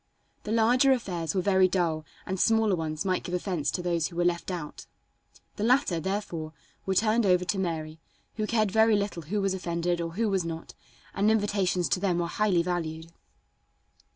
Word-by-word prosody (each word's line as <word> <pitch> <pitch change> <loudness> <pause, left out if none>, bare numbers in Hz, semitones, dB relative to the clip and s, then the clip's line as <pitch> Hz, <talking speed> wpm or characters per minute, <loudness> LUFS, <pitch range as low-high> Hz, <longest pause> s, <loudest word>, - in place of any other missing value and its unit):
The 210 - -3
larger 240 +4 +4
affairs 180 -9 -3
were 185 - +1
very 190 -1 +4
dull 165 -4 -1 0.2
and 190 0 -3
smaller 220 -2 +3
ones 160 +1 -3
might 185 -1 +1
give 180 - -3
offense 175 -6 -1
to 180 - -3
those 170 -3 0
who 170 - -12
were 175 0 +1
left 175 +1 0
out. 170 -5 -6 0.7
The 210 - -2
latter, 240 - +3
therefore, 180 -4 -4 0.3
were 190 - +1
turned 220 +3 +3
over 180 -2 +3
to 180 +2 -1
Mary, 160 -3 -3 0.3
who 215 -1 -2
cared 215 -3 +1
very 220 +1 +4
little 200 -4 -2
who 185 +7 -2
was 195 -1 +1
offended 175 -1 -1
or 165 0 -4
who 225 +5 0
was 195 -3 +1
not, 165 -1 -6 0.4
and 205 +2 +2
invitations 200 -5 +1
to 135 - +1
them 180 -3 0
were 175 - 0
highly 180 -1 +1
valued. 165 -2 -3
185 Hz, 185 wpm, -27 LUFS, 170-210 Hz, 0.7 s, larger